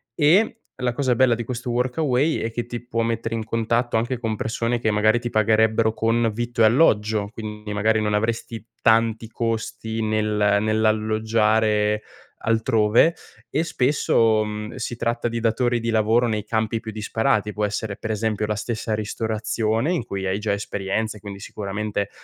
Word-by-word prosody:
e 185 +9 +3 0.2
la 125 -1 -1
cosa 130 -1 +1
bella 120 -1 +4
di 120 - -4
questo 120 +1 -5
Workaway 130 +4 +1
è 115 - -2
che 120 +1 -3
ti 120 0 -6
può 120 -1 -2
mettere 115 0 -2
in 115 - -2
contatto 115 +2 0
anche 120 +3 -1
con 110 -3 -2
persone 115 +2 -1
che 115 - 0
magari 110 +2 +3
ti 120 0 -4
pagherebbero 110 0 +3
con 115 0 +1
vitto 120 +1 -2
e - - +8
alloggio, 110 -4 +3
quindi 105 -1 -6
magari 110 +2 +2
non 105 -1 0
avresti 115 0 -2 0.2
tanti 115 0 +3
costi 115 -1 -3
nel 105 -1 +1
nell'alloggiare 110 0 +1 0.4
altrove, 115 +6 +3 0.3
e 155 +7 0
spesso, 115 -7 +2
mhmm, 105 +1 -6
si 120 - -4
tratta 120 0 -1
di 115 0 -2
datori 120 +1 +1
di 115 0 -3
lavoro 115 +2 +3
nei 110 -2 -1
campi 110 +1 -1
più 110 0 -7
disparati, 105 0 0
può 105 0 0
essere 105 0 -3
per 110 - -4
esempio 110 0 -1
la 105 - -1
stessa 110 +1 -3
ristorazione 110 +4 -1
in 150 - -2
cui 95 -1 -4
hai 95 +1 0
già 105 -1 -1
esperienza, 100 +2 -3
quindi 100 -1 -8
sicuramente 105 0 -4
110 Hz, 165 wpm, -23 LUFS, 105-115 Hz, 0.4 s, e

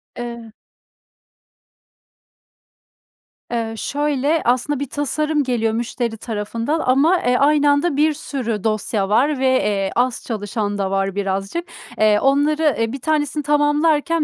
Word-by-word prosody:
Evet. 235 -2 -7 3.0
Eee, 225 -1 -2
şöyle 290 +3 0
aslında 255 +4 +1
bir 280 -2 -4
tasarım 300 +1 -1
geliyor 225 -3 0
müşteri 235 0 -3
tarafından 230 +8 -3
ama, 290 +8 +3
eee, 250 0 +2
aynı 290 +1 +3
anda 285 +1 +1
bir 305 +1 +3
sürü 240 -8 -4
dosya 215 -2 -1
var 275 +6 +2
ve, 265 - 0
eee, 205 -7 +1
az 245 0 0
çalışan 205 -2 -3
da 195 -1 -2
var 195 0 -1
birazcık. 195 - -3 0.3
Eee, 215 -1 +4
onları, 290 +3 +2
e 225 0 0
1 275 - -5
tanesini 300 -1 0
tamamlarken 295 +2 +2
255 Hz, 125 wpm, -20 LUFS, 220-295 Hz, 3.0 s, Eee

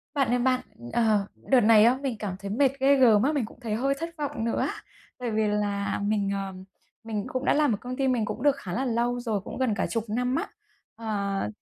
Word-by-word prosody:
Bạn 275 -2 +2
ơi 245 0 +2
bạn, 255 0 +2 0.3
ờ, 215 -4 +2
đợt 260 -2 +2
này 215 -1 +6
á 245 +2 +4
mình 265 -5 -2
cảm 200 -4 -3
thấy 200 - -6
mệt 265 +4 +3
ghê 275 +1 +5
gớm 230 -6 +5
á, 285 - +3
mình 285 -7 0
cũng 215 - -15
thấy 220 -4 -2
hơi 270 +5 +1
thất 330 +1 -3
vọng 285 -6 -3
nữa 230 - 0
á. - - 0 0.5
Bởi 245 -2 -3
vì 215 0 +1
là 205 -1 -1
mình, 205 -1 0
ờ, 195 -1 -3 0.5
mình 215 -2 -3
cũng 255 +1 -3
đã - - +4
làm 295 -5 +3
ở - - -8
công 250 +1 -5
ty 270 - +1
mình 245 -4 +1
cũng 245 - -5
được 285 -2 +4
khá 190 -10 -7
là 265 +6 -1
lâu 240 +1 0
rồi, 220 -5 -2
cũng - - -8
gần 255 -4 +1
cả - - -1
10 230 -2 -2
năm 250 +4 0
á. - - -1 0.5
Ờ, 200 - -2
230 Hz, 250 wpm, -26 LUFS, 210-260 Hz, 0.5 s, này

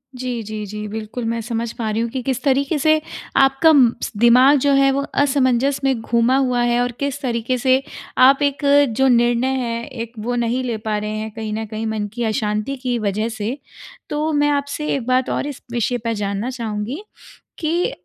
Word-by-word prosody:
जी, 250 -2 -3
जी, 215 0 -5
जी 210 +1 -6
बिल्कुल 220 +3 -5
मैं 230 0 -1
समझ 230 0 -3
पा 225 -2 -2
रही 215 +1 -1
हूँ 235 - -1
कि 260 +1 -4
किस 260 0 -2
तरीक़े 280 +2 +1
से 310 +2 +3 0.4
आपका 270 +4 +5
म 250 -5 +5 0.3
दिमाग 255 +5 +6
जो 285 +2 +2
है 275 0 +4
वो 275 +1 0
असमंजस 270 -1 +2
में 265 -4 +1
घूमा 235 +3 +2
हुआ 250 -2 +1
है 240 0 +2
और 245 - 0
किस 280 0 -2
तरीक़े 240 0 -1
से 260 +1 +3 0.5
आप 275 +1 +4
एक 285 +1 -1 0.3
जो 265 0 +4
निर्णय 240 0 +3 0.2
है 235 0 -3
एक 230 -4 -7
वो 240 +3 -2
नहीं 240 +2 0
ले 235 -3 -2
पा 215 -1 -2
रहे 210 0 -3
हैं 220 0 -5
कहीं 220 -2 -4
न 220 +1 -3
कहीं 220 +1 -5
मन 215 -1 -2
की 240 +1 -3
अशांति 215 +3 -1
की 250 -2 0
वजह 215 +2 -1
से। 220 +3 -4 0.5
तो 305 +1 -1
मैं 290 0 +2
आपसे 285 +1 -2
एक 255 -4 -4
बात 255 0 +2
और - - -1
इस 290 - -7
विषय 240 +1 0
पे 230 0 -3
जानना 205 +3 -2
चाहूँगी 235 - -4 0.6
कि 340 +2 0
245 Hz, 205 wpm, -20 LUFS, 225-270 Hz, 0.6 s, दिमाग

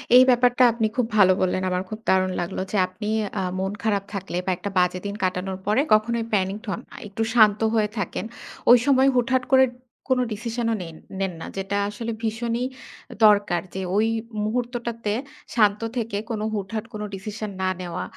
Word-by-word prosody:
এই 255 - +10
ব্যাপারটা 245 0 +4
আপনি 225 -1 0
খুব 250 -3 +2
ভালো 185 -2 +7
বললেন। 185 0 +1
আমার 180 0 -1
খুব 215 0 -6
দারুণ 185 0 +3
লাগলো 175 +2 -3
যে 210 - 0
আপনি 210 +3 -7 0.3
আ - - -1 0.2
মন 190 +1 -1
খারাপ 205 -3 +1
থাকলে 190 -2 -4
বা 190 - +1
একটা 200 - -4
বাজে 180 0 +1
দিন 200 0 -3
কাটানোর 185 +1 -1
পরে 215 +6 +3
কখনোই 230 +2 +2
প্যানিকড 200 +3 0
হন 200 - -2
নাই। - - -11
একটু 215 +3 -2
শান্ত 215 -3 +6 0.2
হয়ে 215 -2 +2
থাকেন। 190 +1 -3 0.5
ওই 245 - +10
সময় 270 -1 +5
হুটহাট 255 +1 +2
করে 265 0 +8 0.4
কোন 260 - +3
ডিসিশন 230 +2 -3
ও - - +1
নেন 165 -2 -8 0.2
নেন 190 -2 -1
না। - - -5
যেটা 195 +1 -2
আসলে 230 +3 -5
ভীষণই 230 +2 -1 0.6
দরকার 205 -4 +4
যে 190 - -2 0.2
ওই 220 +1 +3 0.4
মুহূর্তটাতে 235 -1 -2 0.4
শান্ত 210 -1 +3 0.2
থেকে 225 -3 -2
কোন 215 -2 -2
হুটহাট 210 +2 -3
কোন 210 - -5
ডিসিশন 210 +2 -5
না 185 - +1
নেওয়া 175 -1 -4
210 Hz, 180 wpm, -24 LUFS, 190-235 Hz, 0.6 s, এই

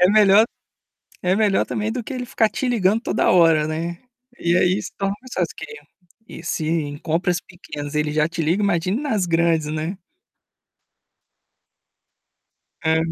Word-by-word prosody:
É 180 - +6
melhor 210 0 +6 0.8
é 185 +1 +2
melhor 210 -2 +2
também 215 +1 -2
do 250 - -3
que 265 - -6
ele 250 - -3
ficar 225 -2 +2
te 260 - -3
ligando 225 -2 +2
toda - - +1
hora, 165 -4 +5
né. 170 +2 -3 0.4
E 170 +1 +2
aí, 185 +2 +3
se - - -7
torna 195 0 -1
mais 255 - -14
fácil - - -1
que - - -7
ele 450 - -10
a 185 +2 -16
e - - -12
se 165 - -2
em 155 -3 -1
compras 170 +4 0
pequenas 145 -4 -8
ele 150 0 0
já 155 0 +2
te 165 0 -5
liga, 170 +6 +1
imagine 185 +2 +1
nas 215 -11 0
grandes, 165 -2 +2
né? 155 +5 -3 2.8
Hã. 160 0 +2
180 Hz, 170 wpm, -22 LUFS, 160-210 Hz, 2.8 s, É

